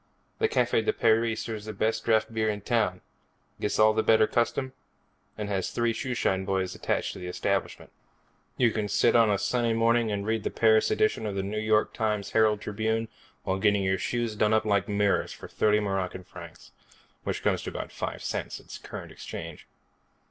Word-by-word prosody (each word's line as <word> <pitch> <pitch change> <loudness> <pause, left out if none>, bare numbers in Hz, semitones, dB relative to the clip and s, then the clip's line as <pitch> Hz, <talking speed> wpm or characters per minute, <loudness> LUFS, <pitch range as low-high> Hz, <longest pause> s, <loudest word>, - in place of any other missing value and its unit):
The 445 - +3
Cafe 440 - +2
de 430 - +1
Paris 115 - +2
serves 110 -3 -5
the 110 - -5
best 110 +2 0
draft 110 0 +2
beer 110 -1 +1
in 105 -1 -3
town, 100 -5 0 0.6
gets 105 - -1
all 110 0 +5
the 110 - +2
better 110 0 +5
custom, 130 +3 -1 0.6
and 105 - -3
has 95 -2 -1
three 120 -1 0
shoeshine 120 -7 -1
boys 95 -1 -1
attached - - -2
to - - -9
the 90 - -6
establishment. 90 - -2 0.7
You 120 -3 +4
can 105 -1 -2
sit - - +3
of 115 -2 +5
a 100 - +2
sunny 120 +2 0
morning 115 0 +2
and 100 -1 -2
read 110 -1 -1
the - - -1
Paris 110 -1 +3
edition 215 - +1
of 100 - -4
the 95 - -1
New 105 +2 -3
York 110 0 +1
Herald 105 -1 +1
Tribune 110 +2 -1 0.3
while 95 0 -1
getting 100 0 +3
your 95 0 +1
shoes 120 +1 -2
done 105 +1 +2
up 110 - +1
like 100 -1 +1
mirrors 100 -1 +1
for - - -10
thirty 105 0 +2
Moroccan 95 -3 -2
francs 85 -2 -12 0.5
which - - -3
comes - - +1
to - - -5
about - - -6
five - - -5
cents - - -4
at - - -10
current - - -8
exchange. - - -8
110 Hz, 190 wpm, -27 LUFS, 100-115 Hz, 0.7 s, all